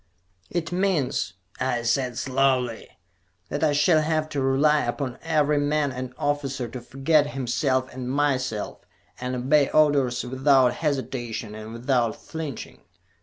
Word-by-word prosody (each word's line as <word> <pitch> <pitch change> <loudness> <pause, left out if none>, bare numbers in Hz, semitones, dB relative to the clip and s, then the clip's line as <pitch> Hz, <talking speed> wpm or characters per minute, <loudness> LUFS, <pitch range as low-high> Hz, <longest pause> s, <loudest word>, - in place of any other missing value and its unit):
"It 170 -1 -3
means," 175 - 0 0.3
I 125 -2 0
said 125 +1 0
slowly, 130 -3 +1 0.6
"that 145 +2 -2
I 155 - +4
shall 155 +2 +4
have 155 0 0
to 145 -2 -2
rely 145 +3 +3
upon 125 +1 -3
every 150 -2 +2
man 145 0 +1
and 130 0 -5
officer 140 -3 -1
to 125 +2 -7
forget 140 +4 +2
himself 130 -1 0
and 125 -1 -5
myself, 130 -6 -1 0.4
and 125 +1 -3
obey 140 +3 +3
orders 140 -5 +3
without 130 0 +3
hesitation 120 -7 -3
and 110 +1 -8
without 120 -1 0
flinching. 160 -6 -7
135 Hz, 130 wpm, -25 LUFS, 125-150 Hz, 0.6 s, I